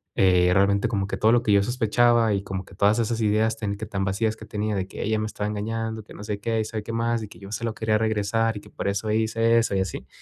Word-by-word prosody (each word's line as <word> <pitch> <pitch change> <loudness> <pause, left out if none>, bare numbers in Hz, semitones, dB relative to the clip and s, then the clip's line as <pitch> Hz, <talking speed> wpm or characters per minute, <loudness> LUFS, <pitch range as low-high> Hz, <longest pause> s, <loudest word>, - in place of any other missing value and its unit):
eh, 90 -2 +4
realmente 100 +1 +3
como 100 -3 -1
que - - -3
todo 110 - +4
lo 120 0 +3
que 105 - +1
yo 100 - +5
sospechaba, 120 -1 +3
y 100 0 -1
como 95 -1 -4
que 100 - -16
todas 105 +3 +3
esas 115 0 0
ideas, 110 +1 +2
ten 100 -2 -3
que 110 - -5
tan 95 -2 -2
vacías 110 +3 0
que 110 - -10
tenía, 105 0 -2
de 95 -1 -2
que - - -6
ella 110 +1 0
me 110 - -2
estaba 105 -1 -4
engañando, 110 +1 -3
que - - -14
no 105 - -9
sé 105 -1 -4
qué, 115 +1 -1
y - - -2
sabe 110 -1 -4
qué 115 - -6
más. 115 0 0
Y - - -6
que - - -14
yo 100 0 -10
se 115 +1 -3
lo 115 - -2
quería 110 -1 +1
regresar, 110 0 0
y - - -7
que - - -16
por - - -4
eso 105 +2 -2
hice 115 +1 +2
eso, 115 -3 0
y 95 - +2
así. 95 - -5
110 Hz, 295 wpm, -25 LUFS, 100-115 Hz, -, yo